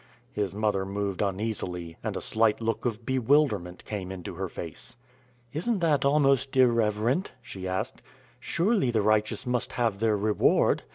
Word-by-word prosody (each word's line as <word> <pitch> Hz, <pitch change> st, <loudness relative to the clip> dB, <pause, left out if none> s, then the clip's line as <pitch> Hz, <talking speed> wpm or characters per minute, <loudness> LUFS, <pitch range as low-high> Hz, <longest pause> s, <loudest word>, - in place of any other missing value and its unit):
His 100 Hz, -3 st, -2 dB
mother 105 Hz, -2 st, +1 dB
moved 100 Hz, 0 st, -3 dB
uneasily, 95 Hz, -4 st, -3 dB
and -, -, -2 dB
a -, -, -4 dB
slight 110 Hz, -1 st, +2 dB
look 115 Hz, 0 st, -2 dB
of 115 Hz, -1 st, -2 dB
bewilderment 125 Hz, -8 st, +1 dB
came 95 Hz, -3 st, -5 dB
into 90 Hz, -3 st, -6 dB
her -, -, -4 dB
face. -, -, -8 dB, 0.6 s
"Isn't 210 Hz, +9 st, 0 dB
that 155 Hz, -4 st, +2 dB
almost 135 Hz, -2 st, +3 dB
irreverent?" 115 Hz, -, +2 dB
she 95 Hz, -6 st, -7 dB
asked. 95 Hz, 0 st, -3 dB, 0.4 s
"Surely 195 Hz, -, +1 dB
the 110 Hz, -3 st, +1 dB
righteous 110 Hz, 0 st, +1 dB
must 125 Hz, -1 st, -1 dB
have 115 Hz, -5 st, 0 dB
their 110 Hz, -1 st, +2 dB
reward. 105 Hz, +1 st, +3 dB
110 Hz, 150 wpm, -27 LUFS, 100-130 Hz, 0.6 s, almost